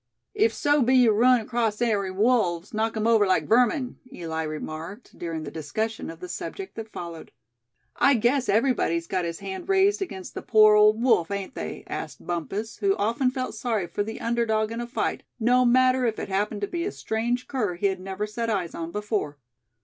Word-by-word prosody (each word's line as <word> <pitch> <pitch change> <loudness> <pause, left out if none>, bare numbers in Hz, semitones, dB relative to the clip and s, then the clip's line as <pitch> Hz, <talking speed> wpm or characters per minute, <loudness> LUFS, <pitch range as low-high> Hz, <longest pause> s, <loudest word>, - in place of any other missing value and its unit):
"If 430 +2 +3
so 290 0 +2
be 255 +2 +3
ye 250 -3 +6
run 240 +3 +4
acrost 225 -2 -1
ary 210 -5 +1
wolves, 190 -3 +1
knock 220 +1 -1
'em 215 - -1
over 225 -3 +4
like 185 - +1
vermin," 250 +3 +2
Eli 160 -8 -4
remarked, 160 +7 -6
during 165 -2 -5
the 145 - -7
discussion 215 +10 -3
of 165 +1 -10
the 180 - -6
subject 385 - -6
that 220 -1 -8
followed. 170 -2 -8 0.7
"I 275 - +5
guess 240 +2 +1
everybody's 210 -7 +2
got 185 0 -1
his 170 +2 -5
hand 195 - -6
raised 390 +1 +3
against 190 - -6
the - - -5
poor 215 -1 +6
old 215 +2 +5
wolf, 200 -10 +3
ain't 200 +4 -4
they?" - - -6
asked - - -6
Bumpus; 175 +7 -4
who 395 -1 +2
often 235 +5 +1
felt 255 0 -4
sorry 220 -4 -1
for 170 +4 -3
the 220 +2 -4
underdog 225 -2 0
in 230 +1 -4
a 240 - -5
fight, 240 - -2 0.2
no 250 +2 +4
matter 255 +1 +4
if 220 - -2
it - - -5
happened 205 +2 -1
to 200 - -1
be 340 - -3
a 395 - -2
strange 240 +3 -2
cur 215 -10 -1
he 180 - -3
had 190 -1 +1
never 190 +2 -4
set 230 +2 -3
eyes 190 -6 -1
on 165 0 -5
before. 210 -8 -2
220 Hz, 200 wpm, -25 LUFS, 190-245 Hz, 0.7 s, ye